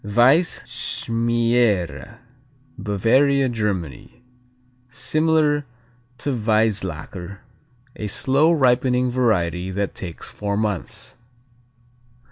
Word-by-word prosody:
Weisschmiere 115 - +1 0.6
Bavaria, 130 +7 +2
Germany 105 - -4 0.7
Similar 150 +1 +1 0.5
to 145 - -2
Weisslacker, 100 - -1 0.5
a 105 - -5
slow 135 +9 +2
ripening 125 -3 +2
variety 95 -8 0
that 100 +1 -2
takes 85 -3 -8
four 100 -1 -3
months. 105 -5 -4
115 Hz, 70 wpm, -22 LUFS, 100-130 Hz, 0.7 s, Bavaria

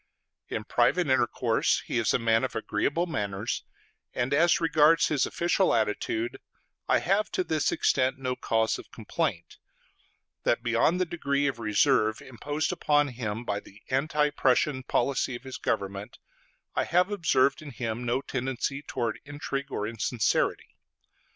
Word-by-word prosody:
In - - -4
private - - +2
intercourse - - +1
he 120 - -1
is 115 - +2
a - - +3
man 115 -1 +2
of 130 - -3
agreeable 125 +10 0
manners; 105 - -3 0.5
and 125 +3 0
as 170 +4 +4
regards 165 -1 +4
his 145 -4 +1
official 175 -2 +1
attitude, 110 +1 -1 0.5
I - - +4
have 200 +4 +1
to 185 - +1
this 155 -3 0
extent 130 -1 +1
no 130 -1 -2
cause 115 -2 0
of - - -12
complaint 85 - -3 0.8
that 120 - +1
beyond 120 +9 +2
the 185 - +2
degree 145 -4 -1
of 135 -4 -1
reserve 110 0 +2
imposed 145 +6 -3
upon 145 -4 +2
him 115 -2 -4
by 105 -2 -1
the 105 +1 -17
anti 150 +2 +1
Prussian 130 0 +2
policy 130 0 0
of 120 - -9
his 130 -1 -7
government, 100 +3 -3 0.6
I - - 0
have 180 +3 +2
observed 165 -9 +2
in 150 - -8
him 120 -2 -4
no 120 +2 0
tendency 130 +1 -3
towards 120 -6 -3
intrigue 140 -1 -5
or 105 - -2
insincerity. 115 +1 -1
130 Hz, 150 wpm, -27 LUFS, 115-150 Hz, 0.8 s, as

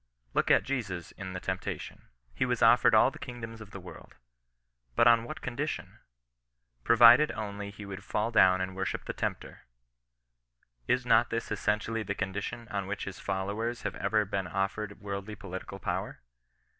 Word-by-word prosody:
Look - - +1
at - - +5
Jesus 100 -11 -3
in 95 -2 -7
the 90 - -4
temptation. 95 0 -5 0.3
He - - 0
was - - +1
offered - - +6
all - - +6
the - - -12
kingdoms 115 -2 -7
of 105 - -10
the 100 - -8
world. 90 -1 -12 0.8
But 115 - +5
on 115 -1 +5
what - - -8
condition? 135 +5 -4 0.8
Provided 120 - +7
only 100 -1 -5
he 100 0 -10
would 100 0 -7
fall 105 +2 -1
down 95 -4 +5
and 95 0 -3
worship 95 +1 -3
the - - -4
Tempter. - - -5 1.2
Is 125 - +1
not 115 0 +4
this 115 0 -3
essentially 110 +2 0
the 100 -1 -3
condition 100 +4 -4
on 100 -2 -3
which 105 +1 -3
his 100 -1 -7
followers 100 +5 -2
have 100 - -2
ever 105 +1 +1
been 95 -1 -2
offered 100 +3 -2
worldly 100 +1 -5
political 95 -1 -7
power? 90 - -4
100 Hz, 165 wpm, -30 LUFS, 95-115 Hz, 1.2 s, Provided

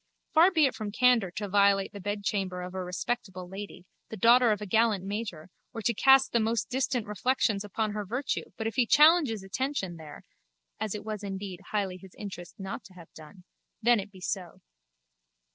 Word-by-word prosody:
Far 335 +3 +7
be 320 -5 +3
it 265 - +1
from 215 -2 -5
candour 245 -3 +3
to 210 - -3
violate 200 0 +3
the 200 - -8
bedchamber 200 -2 -2
of 180 0 -7
a 190 -1 -3
respectable 185 0 -4
lady, 190 -1 -9 0.2
the 220 - -7
daughter 235 +3 +6
of 210 - 0
a 210 - -5
gallant 215 -1 +2
major, 195 -5 -5 0.2
or 225 -2 -6
to 235 - +2
cast 265 +4 +5
the 235 - +2
most 225 +2 -1
distant 250 -3 0
reflections 210 0 0
upon 215 +1 -2
her 210 0 -3
virtue 250 +8 -3
but 220 - -4
if 225 - -3
he 245 -2 +3
challenges 295 - +5
attention 195 -3 -3
there 155 -2 -11 0.6
(as 215 -1 -2
it 210 0 -7
was 215 -1 -4
indeed 195 -2 -5
highly 195 -3 -1
his 190 0 -15
interest 190 -4 -8
not 195 0 -6
to 185 - -15
have 170 -3 -14
done) 160 +4 -14 0.4
then 240 +1 +5
be 190 - -15
it 185 - -12
so. 185 -4 -4
205 Hz, 195 wpm, -28 LUFS, 190-235 Hz, 0.6 s, Far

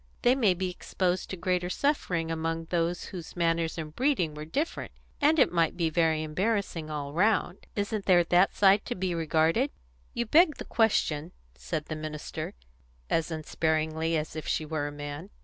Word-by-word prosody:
They 245 - +6
might 215 -9 +2
be 185 0 -1
exposed 180 0 -2
to 190 - -5
greater 180 +1 0
suffering 180 - 0
among 165 0 -2
those 175 0 0
whose 175 -3 -7
manners 165 -1 0
and 155 -1 -6
breeding 245 - +1
were 150 0 -7
different, 285 - -3 0.3
and 305 +3 +4
it 265 - +5
might 170 -1 +1
be 165 -2 +1
very 160 -1 +2
embarrassing 180 -1 -1
all 145 -2 -4
round. 195 0 +1
Isn't 205 0 -2
there 175 -2 +6
that 175 +3 +3
side 200 0 +5
to - - -3
be 185 -1 -1
regarded?" 165 - +2 0.5
"You 235 - 0
beg 310 +5 +5
the - - -7
question," 175 -8 +1 0.2
said 65 - -4
the 155 - -4
minister, 155 -1 -5 0.6
as 165 0 +1
unsparingly 160 0 0
as 155 0 -4
if 155 - -5
she 155 - 0
were 150 -1 -2
a - - -5
man. 145 +4 -7
170 Hz, 175 wpm, -28 LUFS, 155-195 Hz, 0.6 s, They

